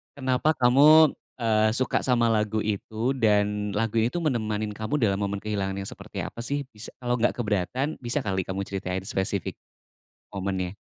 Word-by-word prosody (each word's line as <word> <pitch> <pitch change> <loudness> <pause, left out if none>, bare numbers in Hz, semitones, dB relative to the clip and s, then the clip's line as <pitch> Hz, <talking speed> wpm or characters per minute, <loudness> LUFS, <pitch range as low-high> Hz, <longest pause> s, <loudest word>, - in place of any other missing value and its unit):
Kenapa 130 +3 +1
kamu, 145 +5 +6 0.2
eee, 110 -3 +2
suka 130 +1 +1
sama 120 -3 +2
lagu 110 0 0
itu, 110 +3 -2
dan 105 -2 +1
lagu 115 +1 0
itu 115 +6 0
menemani 110 -7 -1
kamu 110 +7 -3
dalam 100 -2 +2
momen 100 -1 -3
kehilangan 100 -2 -2
yang 100 0 -4
seperti - - -7
apa - - -8
sih? 140 +5 -2
Bis 105 0 -9
kalau 125 -1 -1
nggak 120 - +2
keberatan, 120 - -1
bisa 125 +3 -2
kali 95 -3 -2
kamu 95 +1 -2
ceritain 95 -1 -4
spesifik 95 -1 -2 0.7
momennya. 95 -1 -3
110 Hz, 160 wpm, -26 LUFS, 100-125 Hz, 0.7 s, kamu